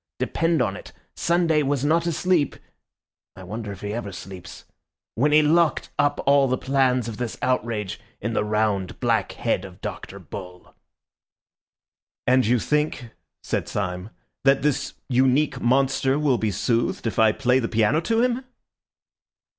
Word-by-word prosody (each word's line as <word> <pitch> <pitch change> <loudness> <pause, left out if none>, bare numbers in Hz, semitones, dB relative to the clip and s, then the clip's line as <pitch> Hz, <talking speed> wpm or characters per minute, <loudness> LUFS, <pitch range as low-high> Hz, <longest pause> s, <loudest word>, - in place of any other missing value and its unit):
Depend 165 -5 +1
on 100 -4 -2
it, - - -11 0.2
Sunday 170 -3 +2
was 140 -1 0
not 165 +3 +2
asleep 170 -2 +1 0.8
(I 95 - -11
wonder 105 +3 -6
if 100 - -9
he 105 0 -4
ever 110 -3 -4
sleeps?) 90 -1 -10 0.5
when 145 +6 +2
he 155 +1 +6
locked 165 +1 +2
up 145 0 +2
all 140 -1 +5
the 130 0 0
plans 130 -3 +1
of 110 -2 -6
this 120 -2 -4
outrage 115 -5 -1 0.2
in 115 +2 -3
the - - +1
round, 105 -3 -1
black - - 0
head 95 - -1
of 95 -1 -11
Dr. 100 - -7
Bull." 90 0 -10 1.5
"And 130 -2 +3
you 125 +2 +4
think," 150 -2 -1 0.3
said - - -2
Syme, 90 0 -3 0.3
"that 135 0 +4
this 150 -2 0
unique 130 +3 +2
monster 135 +2 +2
will 140 -5 +2
be 110 - 0
soothed 115 +6 -1
if 115 - -2
I 110 -1 +6
play 125 +2 +2
the 115 - -2
piano 115 +7 +2
to 225 +6 +1
him?" 250 +1 0
125 Hz, 155 wpm, -24 LUFS, 105-145 Hz, 1.5 s, he